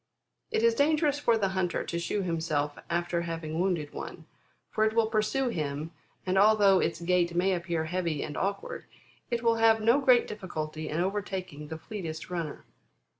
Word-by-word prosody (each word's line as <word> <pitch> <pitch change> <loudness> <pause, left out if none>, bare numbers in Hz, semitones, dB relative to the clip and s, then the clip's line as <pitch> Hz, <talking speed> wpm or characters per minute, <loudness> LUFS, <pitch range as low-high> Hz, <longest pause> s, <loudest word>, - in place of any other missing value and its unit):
It 220 - 0
is 230 0 +5
dangerous 295 +2 +2
for 235 -5 +3
the 195 -3 +1
hunter 185 -2 -1
to 170 - -3
shew 195 +4 -1
himself 160 -4 -1
after 170 0 0
having 165 -1 -4
wounded 175 -6 0
one, - - -7 0.5
for 215 - +1
it 220 0 +2
will 230 0 +3
pursue 220 +4 0
him, 155 -4 -3 0.3
and, 185 +1 +2
although 205 -2 +6
its 165 0 -1
gait 175 0 +1
may 185 +2 +3
appear 170 -2 -1
heavy 170 -3 -1
and 150 - -6
awkward, 470 - -3 0.4
it 235 -1 -1
will 230 -1 +3
have 225 0 +5
no 230 +5 +4
great 255 -3 +5
difficulty 155 -6 -5
in 155 - -2
overtaking 185 -5 -3
the 160 +1 -6
fleetest 165 -2 -6
runner. 165 -4 -4
185 Hz, 175 wpm, -29 LUFS, 165-220 Hz, 0.5 s, although